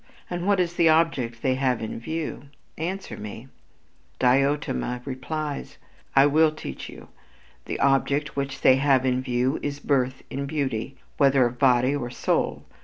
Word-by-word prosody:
And 175 +1 -3
what 200 -2 +3
is 175 -1 +1
the 170 -1 +4
object 140 -8 +1
they 130 - +2
have 130 -2 0
in 110 0 -5
view? 160 +3 -4 0.3
Answer 185 +5 -4
me." 105 +5 -8 0.7
Diotima 130 -1 +1
replies: 145 +3 -5 0.4
"I 135 0 +7
will 155 +2 +4
teach 155 - -7
you. - - -12 0.6
The - - -4
object 140 +2 +1
which 140 0 -3
they 130 - +6
have 135 -1 +3
in 130 0 +1
view 130 +2 0
is 145 0 -3
birth 130 -3 0
in 140 +1 -3
beauty, 135 -4 -3 0.2
whether 135 -2 +4
of 120 +1 -3
body 130 0 +4
or 120 -4 -3
soul.... 120 - -1
135 Hz, 155 wpm, -25 LUFS, 125-150 Hz, 0.7 s, I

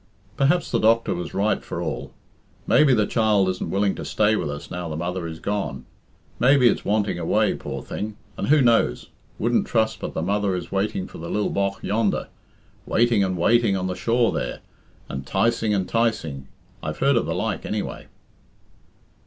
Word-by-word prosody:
"Perhaps 155 +8 +2
the - - +2
doctor 115 +1 +3
was 90 0 -5
right 105 +2 +1
for - - -5
all. - - -4 0.5
Maybe 150 -3 +5
the 110 -4 +4
child 105 -4 +2
isn't 90 - -3
willing 100 0 +1
to - - -7
stay 105 +1 +2
with 75 - -2
us 75 0 -7
now 90 -1 -4
the 80 - -4
mother 85 +1 -3
is 80 0 -7
gone; 100 +2 -3 0.5
maybe 130 0 +5
it's - - +1
wanting 105 -3 0
away, 80 - +2
poor - - -6
thing. 105 0 -5 0.2
And - - -3
who 150 -1 +5
knows? 115 - +2 0.3
Wouldn't 120 +2 +1
trust 110 -2 +1
but - - -6
the 80 - -1
mother 100 +1 0
is 90 -2 -6
waiting 95 -1 -1
for - - -11
the 85 +1 -6
lil 105 - 0
bogh 100 0 0
yonder 105 0 0 0.6
waiting 115 -3 +3
and 95 -1 -1
waiting 110 +2 +3
on 90 - -2
the 95 - -1
shore 115 +5 +2
there, - - -3 0.5
and 70 0 -5
'ticing 115 +8 +1
and 95 -3 0
'ticing 110 - -1 0.3
I've 75 - -4
heard 140 0 +3
of 115 - +1
the - - -1
like, - - -2
anyway." - - -4
105 Hz, 185 wpm, -23 LUFS, 90-115 Hz, 0.6 s, Maybe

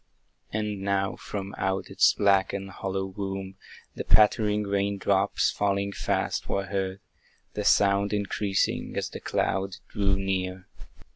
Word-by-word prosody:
And 105 -2 -2
now 95 0 0
from 100 -1 -6
out 95 0 -1
its - - +4
black 100 -2 +3
and 95 0 -4
hollow 95 +1 -3
womb, 95 0 -5 0.4
The - - -5
pattering 105 0 +4
rain 100 0 0
drops, 95 0 +2
falling 100 0 0
fast, - - -1
were 100 0 0
heard, 95 0 -3 0.5
The 105 - -3
sound 100 0 +4
increasing 100 -1 -1
as - - -1
the - - -7
cloud 95 +1 -1
drew 100 -2 +1
near. 95 -1 -2
100 Hz, 135 wpm, -27 LUFS, 95-100 Hz, 0.5 s, its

